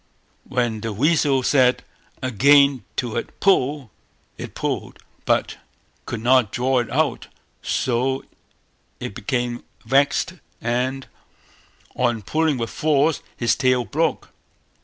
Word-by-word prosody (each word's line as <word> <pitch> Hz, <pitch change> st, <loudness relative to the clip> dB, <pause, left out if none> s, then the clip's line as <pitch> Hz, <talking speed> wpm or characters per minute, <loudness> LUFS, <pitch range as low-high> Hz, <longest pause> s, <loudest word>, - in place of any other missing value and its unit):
When 120 Hz, -4 st, -1 dB
the 115 Hz, -1 st, -3 dB
weasel 140 Hz, +2 st, +2 dB
said 130 Hz, -2 st, +3 dB, 0.4 s
again 140 Hz, +1 st, +4 dB
to 120 Hz, -3 st, -2 dB
it -, -, -6 dB
"Pull", 145 Hz, -, +2 dB, 0.4 s
it -, -, -8 dB
pulled, -, -, -3 dB, 0.3 s
but -, -, +1 dB, 0.5 s
could 115 Hz, -, -4 dB
not 125 Hz, -3 st, +4 dB
draw 130 Hz, +1 st, +1 dB
it 120 Hz, -, -3 dB
out; 145 Hz, -2 st, 0 dB, 0.3 s
so 130 Hz, +2 st, -1 dB, 0.7 s
it -, -, -5 dB
became 120 Hz, +3 st, -2 dB, 0.2 s
vexed, 140 Hz, +8 st, +2 dB, 0.3 s
and 125 Hz, +3 st, -1 dB, 0.9 s
on 120 Hz, -4 st, 0 dB
pulling 155 Hz, +4 st, +1 dB
with 115 Hz, -1 st, -3 dB
force, 150 Hz, 0 st, +1 dB, 0.2 s
its 115 Hz, -, +2 dB
tail 125 Hz, -2 st, +2 dB
broke. 160 Hz, +6 st, -1 dB
130 Hz, 115 wpm, -22 LUFS, 120-140 Hz, 0.9 s, again